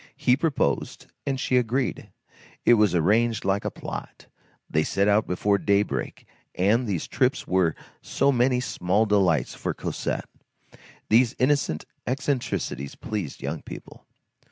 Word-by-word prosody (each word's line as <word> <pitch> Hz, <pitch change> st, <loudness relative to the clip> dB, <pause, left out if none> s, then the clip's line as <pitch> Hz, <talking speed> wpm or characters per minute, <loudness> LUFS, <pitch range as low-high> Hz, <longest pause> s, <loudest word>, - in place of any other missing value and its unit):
He 125 Hz, -, +3 dB
proposed, 135 Hz, -, -1 dB, 0.2 s
and 135 Hz, -1 st, -1 dB
she 130 Hz, -, +1 dB
agreed. 125 Hz, +1 st, -1 dB, 0.6 s
It -, -, +7 dB
was 105 Hz, -5 st, +4 dB
arranged 110 Hz, +6 st, +2 dB
like 100 Hz, +1 st, +1 dB
a -, -, -1 dB
plot, -, -, -8 dB, 0.4 s
they 80 Hz, -, +1 dB
set 100 Hz, +4 st, +1 dB
out 105 Hz, +2 st, +3 dB
before 100 Hz, +3 st, +1 dB
daybreak, 100 Hz, -, 0 dB, 0.3 s
and 110 Hz, +7 st, +2 dB
these 95 Hz, -6 st, -2 dB
trips -, -, 0 dB
were 90 Hz, -4 st, +2 dB, 0.3 s
so 140 Hz, -, +1 dB
many 125 Hz, 0 st, +2 dB
small 100 Hz, -1 st, +1 dB
delights 95 Hz, -, +2 dB
for -, -, -4 dB
Cosette. -, -, -3 dB, 0.8 s
These 115 Hz, +2 st, +4 dB
innocent 130 Hz, -, +1 dB, 0.2 s
eccentricities 125 Hz, -, -2 dB
please 100 Hz, -9 st, -5 dB
young -, -, -4 dB
people. -, -, -11 dB
105 Hz, 130 wpm, -25 LUFS, 95-125 Hz, 0.8 s, It